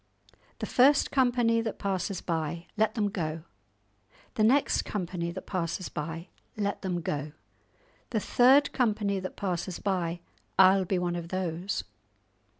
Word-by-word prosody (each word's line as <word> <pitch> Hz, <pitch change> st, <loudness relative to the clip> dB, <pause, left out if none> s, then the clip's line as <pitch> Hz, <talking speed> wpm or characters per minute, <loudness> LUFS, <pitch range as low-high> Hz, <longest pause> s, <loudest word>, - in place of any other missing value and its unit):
"The -, -, -3 dB
first 275 Hz, +3 st, +4 dB
company 245 Hz, -3 st, +3 dB
that 225 Hz, -2 st, -4 dB
passes 195 Hz, -1 st, -2 dB
by, 165 Hz, 0 st, -3 dB
let 215 Hz, +2 st, +1 dB
them 210 Hz, -3 st, +1 dB
go. 160 Hz, -4 st, -3 dB, 0.9 s
The 215 Hz, -, +1 dB
next 265 Hz, +6 st, +3 dB
company 180 Hz, -3 st, -3 dB
that 185 Hz, +2 st, -7 dB
passes 180 Hz, -1 st, -3 dB
by, 165 Hz, +3 st, -5 dB, 0.3 s
let 200 Hz, -1 st, -1 dB
them 180 Hz, -3 st, -2 dB
go. 150 Hz, -1 st, -3 dB, 0.8 s
The 225 Hz, -, 0 dB
third 260 Hz, +7 st, +5 dB
company 210 Hz, -5 st, +1 dB
that 185 Hz, 0 st, -6 dB
passes 180 Hz, -2 st, -2 dB
by, 175 Hz, -3 st, -2 dB, 0.4 s
I'll 190 Hz, 0 st, +6 dB
be 185 Hz, +1 st, 0 dB
one 175 Hz, -1 st, -1 dB
of 170 Hz, -1 st, -5 dB
those. 180 Hz, +1 st, -2 dB
190 Hz, 140 wpm, -28 LUFS, 170-215 Hz, 0.9 s, I'll